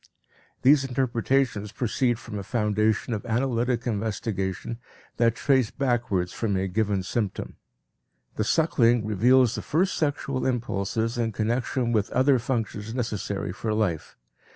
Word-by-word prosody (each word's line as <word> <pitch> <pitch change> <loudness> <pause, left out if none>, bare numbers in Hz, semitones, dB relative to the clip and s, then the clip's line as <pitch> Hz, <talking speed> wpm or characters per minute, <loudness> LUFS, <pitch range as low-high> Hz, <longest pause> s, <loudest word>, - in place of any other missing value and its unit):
These 140 +1 +6
interpretations 125 -4 0
proceed 120 +1 0
from 110 -3 -7
a - - -5
foundation 110 +1 0
of 105 - -3
analytic 120 0 0
investigation 110 -1 -3 0.4
that 115 -1 +3
trace 130 -5 +2
backwards 120 -9 -1
from 105 -4 -1
a 95 +1 -1
given 100 0 0
symptom. 105 0 -3 0.8
The 110 - 0
suckling 120 -5 +3
reveals 120 +4 +4
the - - -3
first 180 +5 +1
sexual 140 -3 -1
impulses 115 -1 -1
in 115 -2 0
connection 120 +3 -1
with 110 -1 +1
other 130 +1 +4
functions 115 -2 -3
necessary 105 -6 -3
for 110 +1 -2
life. 95 -8 -2
115 Hz, 130 wpm, -26 LUFS, 105-125 Hz, 0.8 s, These